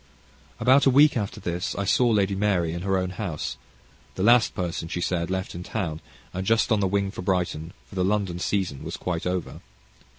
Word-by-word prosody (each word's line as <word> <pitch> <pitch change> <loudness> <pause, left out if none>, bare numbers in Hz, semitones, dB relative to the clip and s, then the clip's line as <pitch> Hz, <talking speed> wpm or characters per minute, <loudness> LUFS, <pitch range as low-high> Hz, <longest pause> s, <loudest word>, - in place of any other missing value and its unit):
About 130 +4 +5
a - - +7
week 145 +3 +6
after 105 -4 -3
this 90 +1 -3
I 100 - -2
saw 120 +5 +3
Lady 100 -3 +2
Mary 95 -5 +1
at 85 - -4
her 95 0 +1
own 90 -1 -1
house, 90 -5 -4 0.6
the 95 - -2
last 120 +2 +5
person, 85 -3 -3
she 90 - -3
said, 85 -1 -1
left 95 0 -3
in 85 - -6
town, 90 -5 -3 0.3
and 95 - -3
just 115 +4 +2
on 110 - +4
the 100 - +2
wing 100 0 0
for 95 - -7
Brighton, 90 -3 -1
for - - -17
the 95 -1 0
London 95 -3 0
season 90 -7 -1
was - - -5
quite 90 -1 -3
over. 90 -1 -3
95 Hz, 205 wpm, -25 LUFS, 90-105 Hz, 0.6 s, a